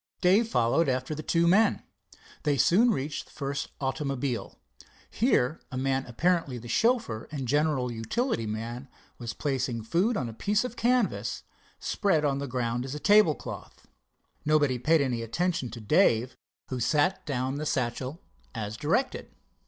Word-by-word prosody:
Dave 195 +5 +4
followed 135 - +2
after 130 +3 -1
the 155 - -5
two 170 +2 +2
men. 195 +6 +4 0.6
They 145 -2 +1
soon 215 - +5
reached 145 - -2
the - - -21
first 140 -1 -3
automobile. 135 -2 -2 0.5
Here 165 - +1
a 130 - -4
man, 135 0 0
apparently 165 +1 0
the 120 0 -9
chauffeur 225 - +1
and 135 -4 -4
general 145 -2 +1
utility 115 - -1
man, 115 +5 -5 0.3
was 120 -2 -5
placing 130 -5 -2
food 190 - +1
on 125 - -2
a 115 - -7
piece 205 - +1
of 250 -2 -5
canvas 245 -2 0 0.4
spread 165 -7 +1
on 140 -1 +1
the 140 - -3
ground 120 -1 -1
as 135 +2 -5
a - - -5
tablecloth. 205 -4 +2 0.6
Nobody 145 -4 +2
paid 155 +5 +3
any 125 -4 -1
attention 130 +3 -1
to 115 +2 -8
Dave, 125 - +3 0.3
who 130 - -3
set 160 +8 +1
down 130 -1 -1
the 155 - -3
satchel 130 +4 -2 0.3
as 110 -1 -4
directed. 165 - -1
140 Hz, 155 wpm, -28 LUFS, 125-170 Hz, 0.6 s, soon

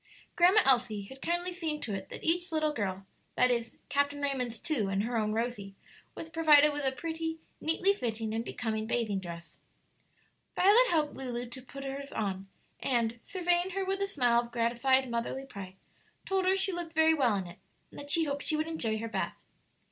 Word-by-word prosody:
Grandma 365 +5 +6
Elsie 240 -6 +3
had 265 +7 -12
kindly 345 +2 -1
seen 325 -4 -3
to 220 - -3
it 195 -1 -5
that - - -8
each 345 +2 +1
little 310 -1 +1
girl 195 -5 -3 0.3
that 250 0 +4
is, 235 -1 -1
Captain 285 0 0
Raymond's 260 -5 -1
two 240 - -1
and 195 +1 0
her 240 +2 -2
own 215 -2 +1
Rosie 220 -3 -3 0.4
was 325 - -6
provided 300 -2 +6
with 290 0 -3
a 265 - +2
pretty, 325 +3 -4 0.2
neatly 360 +5 +2
fitting, 225 - -3
and 225 +1 -1
becoming 220 -2 -3
bathing 220 -4 0
dress. 170 -2 -9 1.0
Violet 420 +7 +6
helped 305 -3 +1
Lulu 245 -2 -4
to 260 +2 -6
put 275 +2 -9
her's 275 +1 -5
on, 195 -2 -3 0.3
and, 235 -2 0
surveying 355 -1 0
her 390 -1 -1
with 390 +1 -1
a 395 - +1
smile 245 -10 +3
of 235 0 -10
gratified 245 +3 +2
motherly 235 +3 -3
pride, 195 -7 -9 0.5
told 385 -1 0
her 380 +1 +4
she 385 0 0
looked 345 -2 -5
very 320 0 +5
well 255 -8 +2
in 190 -2 -2
it, 175 0 -11 0.3
and - - -10
that 285 - -8
she 330 +3 +4
hoped 285 -2 -2
she 310 - 0
would 310 +1 -1
enjoy 235 -10 -1
her 225 +1 -4
bath. 225 - -3
265 Hz, 195 wpm, -30 LUFS, 225-325 Hz, 1.0 s, Grandma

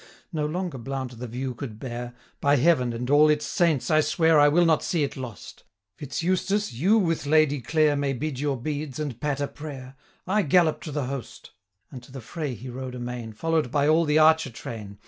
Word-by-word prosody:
No 150 -2 -1
longer 175 -3 -4
Blount 130 -1 -5
the 125 - -5
view 125 +3 -4
could 115 -3 -7
bear: 120 0 -6 0.2
'By 140 +1 +3
Heaven, 130 -3 +3
and 120 +1 -4
all 150 +1 +6
its 150 0 +1
saints! 165 -5 +1
I 155 0 +5
swear 160 0 +3
820 145 - +7
I - - +6
will 175 +3 +4
not 160 -2 +3
see 165 -4 0
it 140 - -3
lost! 125 -7 -9 0.3
Fitz 145 +3 -5
Eustace, 185 +2 0
you 185 - +3
with 165 -7 0
Lady 150 -2 +3
Clare 155 +2 +2
May 140 -1 0
bid 140 0 -4
your 140 -1 -1
beads, 145 +1 -4
and 145 -6 -5
patter 145 -1 -1
prayer, 135 -3 -9 0.3
I 205 +3 +2
gallop 170 -1 +3
to 155 - -5
the 145 -2 -2
host.' 135 -1 -7 0.4
And 130 - -8
to 125 - -17
the 135 - -7
fray 145 +2 -5
he 120 +4 -10
rode 130 0 -6
amain, 120 -3 -6
825 - - -28
Follow'd 165 -4 +1
by 145 0 +2
all 160 +2 +4
the 150 0 +2
archer 160 -2 +5
train. 110 -3 -8
145 Hz, 215 wpm, -25 LUFS, 125-155 Hz, 0.4 s, 820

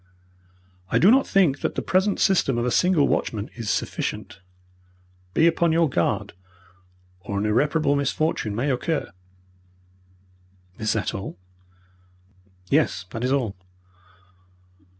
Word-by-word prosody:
I - - +2
do 195 - +6
not 265 +2 +4
think 175 -9 +3
that - - -3
the - - -2
present 190 +2 +1
system 155 -10 +2
of 120 - 0
a 125 - 0
single 180 -3 +3
watchman 105 0 -2
is 115 -3 -5
sufficient. 95 - -3 1.0
Be 160 - +4
upon 170 0 +3
your 165 0 +3
guard, 85 - -1 0.9
or 100 +3 -5
an 100 - -1
irreparable 145 +6 +2
misfortune 140 -5 -1
may 135 +6 0
occur.'" 155 +5 -2 1.7
"Is 110 - 0
that 110 - -2
all?" 95 -3 -6 1.3
"Yes, - - +1
that 115 - -5
is 130 - 0
all." 125 -8 0
140 Hz, 125 wpm, -24 LUFS, 110-165 Hz, 1.7 s, do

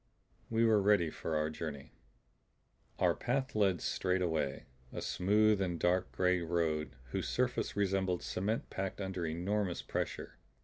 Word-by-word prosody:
We 115 0 +3
were 110 -2 +5
ready 100 -5 +3
for 80 - -3
our 75 0 +1
journey. 75 -2 -6 1.1
Our - - +3
path 135 +2 -1
led 100 -5 +2
straight 90 0 0
away, 80 -5 -1 0.3
a - - -5
smooth 105 +2 +3
and 90 -3 -1
dark 90 +1 +1
gray 90 -1 +2
road 80 -2 -1 0.2
whose - - -2
surface 125 0 0
resembled 95 -3 +1
cement 105 +5 -2
packed 95 0 -3
under 95 -3 -3
enormous 90 +3 -1
pressure. - - -4
90 Hz, 140 wpm, -34 LUFS, 85-105 Hz, 1.1 s, were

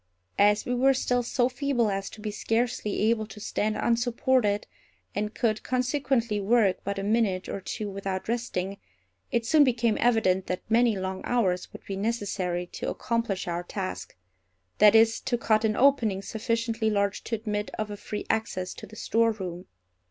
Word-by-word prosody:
As 210 +1 +4
we 245 - -1
were 265 +2 +4
still 250 -1 +1
so 245 +1 +1
feeble 255 -4 0
as 195 0 -3
to 215 - -12
be 210 0 -3
scarcely 225 0 -1
able 220 -2 -1
to 220 - -11
stand 215 +1 -1
unsupported, 235 -2 +1 0.5
and 210 +2 -3
could 220 -4 0
consequently 255 -4 0
work 205 -2 +3
but 200 0 -3
a 195 - -2
minute 205 -3 +1
or 200 - -4
two 210 +2 -4
without 195 -1 -4
resting, 200 -5 -2 0.5
it 235 -1 0
soon 305 +4 +6
became 235 -4 +1
evident 205 -6 +2
that 180 - -3
many 230 -1 +3
long 190 0 -3
hours 190 -7 0
would - - -12
be 195 - -4
necessary 195 -5 -2
to - - -5
accomplish 230 -6 -2
our 175 0 -1
task—that 95 - -1
is, 225 0 +5
to 240 - -1
cut 220 -1 +2
an 215 -1 +1
opening 230 -7 +3
sufficiently 230 +1 -1
large 200 -1 0
to 230 - -1
admit 210 -1 -3
of 215 -1 -3
a - - -4
free 210 +1 -6
access 185 -5 -1
to - - -10
the 215 - -13
storeroom. 205 -6 -1
215 Hz, 165 wpm, -27 LUFS, 195-235 Hz, 0.5 s, soon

